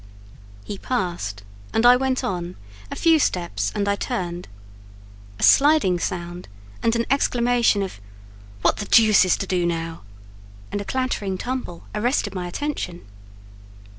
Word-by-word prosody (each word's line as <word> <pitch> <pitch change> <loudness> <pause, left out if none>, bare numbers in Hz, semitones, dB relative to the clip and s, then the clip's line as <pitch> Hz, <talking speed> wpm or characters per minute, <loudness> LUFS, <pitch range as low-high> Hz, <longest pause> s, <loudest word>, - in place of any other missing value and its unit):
He 200 - -7
passed, 175 - -3 0.3
and 225 - +2
I 245 +1 +9
went 260 0 0
on; 175 -1 -3 0.3
a - - -5
few 325 -1 +4
steps, 105 - -1
and 200 -1 -1
I 200 - +2
turned: 180 -7 -4 0.9
a - - -5
sliding 280 - +5
sound 175 -1 -4 0.3
and 230 0 +2
an 235 0 0
exclamation 240 -5 +2
of 185 - -7 0.6
"What - - +3
the 205 - -4
deuce 215 -3 +6
is 185 - +2
to - - -3
do 180 -2 0
now?" 165 -1 -3 0.7
and 205 - -2
a - - -7
clattering 210 -6 -2
tumble, 245 -7 -5
arrested 210 -1 0
my 180 -2 -4
attention. 180 -5 -4
200 Hz, 140 wpm, -23 LUFS, 175-245 Hz, 0.9 s, I